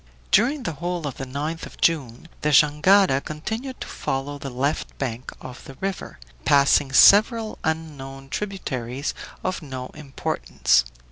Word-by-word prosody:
During 260 +6 +3
the 165 - -2
whole 175 +2 -4
of 140 -3 -5
the 135 - -5
7th 150 +5 -4
of - - -16
June 145 -4 0
the 150 - +1
jangada 150 +2 +5
continued 220 - -5
to - - -5
follow 140 +2 -3
the 135 - -5
left 135 +4 -2
bank 125 -2 -4
of 130 0 -10
the 135 - -10
river, 195 +5 -5 0.3
passing 140 - +4
several 215 - +5
unknown 140 -4 -4
tributaries 135 - -4 0.3
of 185 -1 -2
no 130 -4 -7
importance. 135 - 0
145 Hz, 140 wpm, -23 LUFS, 135-180 Hz, 0.3 s, jangada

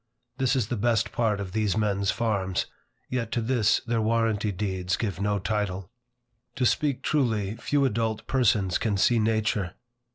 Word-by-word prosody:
This 130 0 +2
is 115 -5 0
the 120 - -1
best 115 +2 +1
part 110 -4 0
of 95 -2 -5
these 105 -2 0
men's 100 -2 +1
farms, 100 -6 0 0.4
yet 120 -3 -3
to - - +1
this 115 -2 +2
their 115 -1 -1
warranty 110 -2 +1
deeds 95 -2 -2
give 100 -5 -3
no 105 0 +1
title. 95 -2 -2 0.6
To 125 - 0
speak 140 +1 +1
truly, 110 -8 0
few 140 +4 +1
adult 110 -2 -1
persons 105 -8 +2
can 105 -3 0
see 115 +4 +3
nature. 110 -4 0
110 Hz, 160 wpm, -26 LUFS, 100-115 Hz, 0.6 s, see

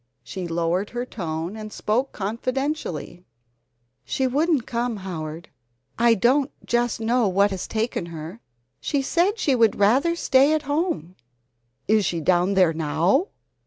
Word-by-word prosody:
She 185 -2 -6
lowered 170 +4 -1
her 245 +1 -4
tone 170 -4 -4
and 215 -1 -7
spoke 245 +7 -1
confidentially: 230 - -3 0.8
"She 265 - -1
wouldn't 285 0 +1
come, 235 -1 -2
Howard: 165 -4 -6 0.5
I 235 -1 +5
don't 260 +7 +2 0.2
just 240 -1 0
know 230 0 +2
what 200 +2 +3
has 190 -2 -4
taken 220 -5 -2
her. 165 +5 -8 0.4
She 280 -2 -1
said 350 - +1
she 285 - +1
would 230 -4 +3
rather 265 +12 +3
stay 275 -2 +4
at 310 - -2
home 285 - -2 0.4
" 120 - -51 0.3
"Is 215 0 +3
she 170 -3 -1
down 180 +3 +2
there 180 -4 +4
now?" 165 - +1
220 Hz, 145 wpm, -23 LUFS, 175-265 Hz, 0.8 s, I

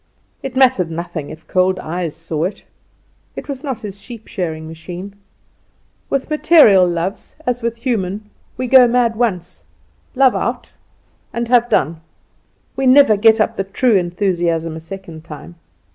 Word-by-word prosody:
It 265 -1 -6
mattered 255 -10 +3
nothing 165 -2 -5
if 160 +1 -11
cold 185 0 +1
eyes 170 -2 -4
saw 165 -1 -3
it. 195 +2 -6 0.7
It - - -7
was 280 -1 -6
not 270 -5 -4
his 200 -2 -8
sheep 235 -3 -11
shearing 160 -5 -4
machine. 175 +4 -8 1.0
With 275 -1 -1
material 300 - +5
loves, 175 +3 -4
as 245 0 -1
with 235 0 -2
human, 210 -4 -3 0.3
we 255 - -2
go 255 0 +7
mad 235 -1 +1
once, 195 -7 -2 0.5
love 265 -1 +4
out, - - -3 0.6
and 235 0 -3
have 240 -1 +4
done. 160 +3 0 0.7
We 270 -1 0
never 255 -4 +6
get 220 +2 +4
up 225 +1 0
the 195 - 0
true 210 +4 +1
enthusiasm 175 -3 0
a - - -6
second 165 -1 -10
time. 165 +1 -10
195 Hz, 150 wpm, -18 LUFS, 170-245 Hz, 1.0 s, go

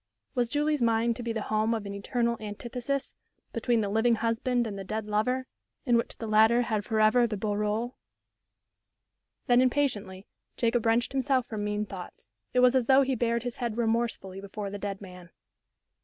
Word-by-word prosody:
Was 245 -3 0
Julie's 295 +1 +1
mind 230 0 +2
to - - -5
be 235 -1 -3
the 220 -2 -2
home 215 +2 +1
of 215 -2 -4
an 200 - -5
eternal 235 +4 -1
antithesis 240 +6 -4 0.4
between 230 -1 +1
the 205 - -1
living 225 +3 +3
husband 235 +2 0
and 210 -3 -4
the 195 - -5
dead 215 +2 -3
lover 220 +5 0 0.4
in 245 -3 +3
which 230 - 0
the 225 - -5
latter 220 +3 +4
had 215 -3 -1
forever 220 +3 +3
the 215 -2 -3
beau 210 +1 -2
rôle? 210 +4 -1 1.5
Then, 245 0 +5
impatiently, 230 -8 0 0.3
Jacob 230 -1 +1
wrenched 230 +2 +2
himself 265 -2 +1
from 215 -3 -4
mean 210 0 -1
thoughts. 190 -3 -9 0.2
It 250 - +3
was 250 +1 +5
as 250 -3 +2
though 270 +1 +6
he 265 0 0
bared 235 -1 0
his 245 -1 -5
head 235 -3 -3
remorse 230 0 +1
fully 190 0 -9
before 200 0 -6
the 205 - -5
dead 200 0 -4
man. 180 -3 -11
230 Hz, 185 wpm, -28 LUFS, 210-245 Hz, 1.5 s, though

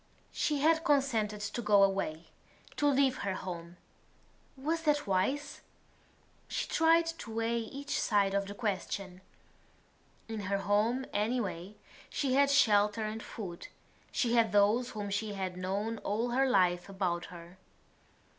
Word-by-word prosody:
She 295 -2 0
had 320 +2 +3
consented 235 -9 +1
to 205 +4 -3
go 205 -3 +5
away, 185 -5 -1 0.5
to 290 - +2
leave 275 -2 +3
her 195 -2 -2
home. 175 -2 -7 0.8
Was 320 +5 -1
that 295 -2 +1
wise? 265 +10 -1 0.9
She - - -2
tried 330 +1 +4
to 225 - -8
weigh 230 +1 0
each 275 +6 -4
side 200 -3 +2
of 200 0 0
the 200 - -7
question. 195 -3 -3 1.1
In 225 -1 -5
her 200 - +1
home 215 +6 +1
anyway 205 -4 -2 0.3
she 270 -3 -1
had 280 +1 +4
shelter 210 -5 +4
and 215 +1 -4
food; 185 -7 -7 0.4
she 245 -4 0
had 230 -2 +3
those 210 +5 +3
whom 205 -3 -5
she 210 +1 -2
had 190 -2 -3
known 200 +5 -3
all 225 +4 -1
her 265 +2 +2
life 180 -5 +2
about 180 -3 -2
her. 175 +1 -12
210 Hz, 140 wpm, -31 LUFS, 195-260 Hz, 1.1 s, go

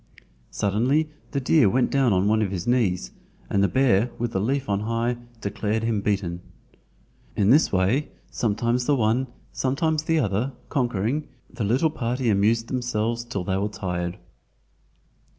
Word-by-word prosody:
Suddenly 130 +10 +1 0.2
the 140 - -1
deer 130 -3 +4
went 125 +4 +1
down 135 -4 +3
on 95 +1 +2
one 110 +1 +3
of 105 - 0
his 90 -3 -4
knees, 95 - +1 0.4
and 100 - +2
the 100 - +4
bear 125 -3 +3
with 120 -1 -2
the 95 - -1
leaf 135 +5 -1
on 100 -1 +1
high 115 +3 -1 0.2
declared 105 +2 -2
him 115 -3 0
beaten. 95 -4 -1 0.9
In 100 +1 +3
this 150 +4 +5
way, 100 +10 +1 0.2
sometimes 120 +2 0
the 145 - +4
one, 120 +2 +1 0.3
sometimes 155 +4 0
the 160 +1 +1
other, 125 0 0 0.2
conquering, 125 +1 -1 0.2
the 115 - -4
little 130 +10 +2
party 125 -3 -1
amused 110 +3 +2
themselves 120 -2 -1
till 110 -6 -4
they 95 +1 -1
were 100 +2 -1
tired. 90 -2 -3
115 Hz, 155 wpm, -24 LUFS, 100-130 Hz, 0.9 s, this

